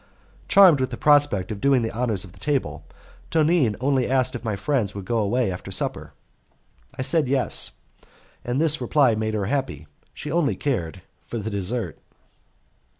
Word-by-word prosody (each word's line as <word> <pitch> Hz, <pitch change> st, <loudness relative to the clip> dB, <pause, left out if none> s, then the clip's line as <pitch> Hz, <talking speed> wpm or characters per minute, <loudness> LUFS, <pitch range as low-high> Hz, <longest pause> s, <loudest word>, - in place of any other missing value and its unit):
Charmed 185 Hz, -7 st, +6 dB
with 130 Hz, 0 st, 0 dB
the 120 Hz, -, -6 dB
prospect 145 Hz, -10 st, +3 dB
of 100 Hz, -2 st, -6 dB
doing 135 Hz, -3 st, +3 dB
the 115 Hz, -, -2 dB
honours 110 Hz, -5 st, -1 dB
of 95 Hz, -, -13 dB
the -, -, -18 dB
table, 145 Hz, -3 st, -2 dB, 0.5 s
Tonine 155 Hz, -8 st, +2 dB
only 130 Hz, -1 st, +1 dB
asked 130 Hz, -1 st, +1 dB
me 120 Hz, -, -4 dB
if -, -, -24 dB
my 110 Hz, -3 st, -2 dB
friends 105 Hz, -1 st, -1 dB
would 100 Hz, -2 st, -6 dB
go 115 Hz, +3 st, 0 dB
away 110 Hz, +1 st, 0 dB
after 90 Hz, -, -7 dB
supper. -, -, -1 dB, 0.8 s
I 130 Hz, -, -2 dB
said 160 Hz, 0 st, +2 dB
yes, 130 Hz, -1 st, 0 dB, 0.7 s
and 120 Hz, +3 st, -2 dB
this 155 Hz, -3 st, +3 dB
reply 130 Hz, 0 st, +3 dB
made 110 Hz, 0 st, -2 dB
her 100 Hz, -2 st, -1 dB
happy; 125 Hz, -, -3 dB, 0.3 s
she -, -, -7 dB
only 165 Hz, -4 st, +1 dB
cared 95 Hz, -, -3 dB, 0.2 s
for 120 Hz, -, -7 dB
the 110 Hz, 0 st, -4 dB
dessert. 100 Hz, +4 st, -3 dB
125 Hz, 175 wpm, -23 LUFS, 105-140 Hz, 0.8 s, Charmed